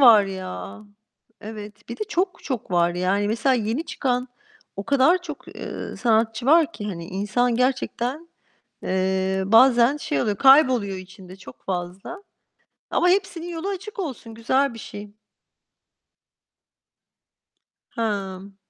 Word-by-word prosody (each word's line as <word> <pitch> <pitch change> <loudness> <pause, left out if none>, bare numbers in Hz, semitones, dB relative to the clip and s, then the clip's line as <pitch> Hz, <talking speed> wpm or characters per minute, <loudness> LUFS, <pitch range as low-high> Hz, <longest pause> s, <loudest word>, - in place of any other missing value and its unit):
var 225 -6 +8
ya! 100 - -7 0.6
Evet, 210 -1 -9
bir 235 - -6
de 430 - -2
çok 365 -1 -1
çok 250 -8 -4
var. 175 -1 +2
Yani, 195 +3 +1
mesela 245 +4 +2
yeni 235 +7 -1
çıkan 250 -5 -1 0.5
o 195 - -4
kadar 285 +6 +3
çok, 305 -4 -9
ııı, - - -6
sanatçı 225 0 +1
var 325 +2 +5
ki, 210 - -7
hani, 170 -5 -5
insan 210 +6 0
gerçekten, 260 +4 -1 0.6
eee, 190 0 0
bazen 240 +4 +5
şey 300 +1 -1
oluyor, 210 -3 0
kayboluyor 260 -8 +5
içinde 185 0 -12
çok 190 - -14
fazla. 190 - -5 0.7
Ama 355 - +2
hepsinin 360 -2 0
yolu 340 +3 -4
açık 400 +2 -6
olsun, 255 - -5
güzel 260 +3 +1
bir - - -9
şey. 205 -1 -9 2.8
Hımm. 200 -3 -4
230 Hz, 125 wpm, -23 LUFS, 195-280 Hz, 2.8 s, var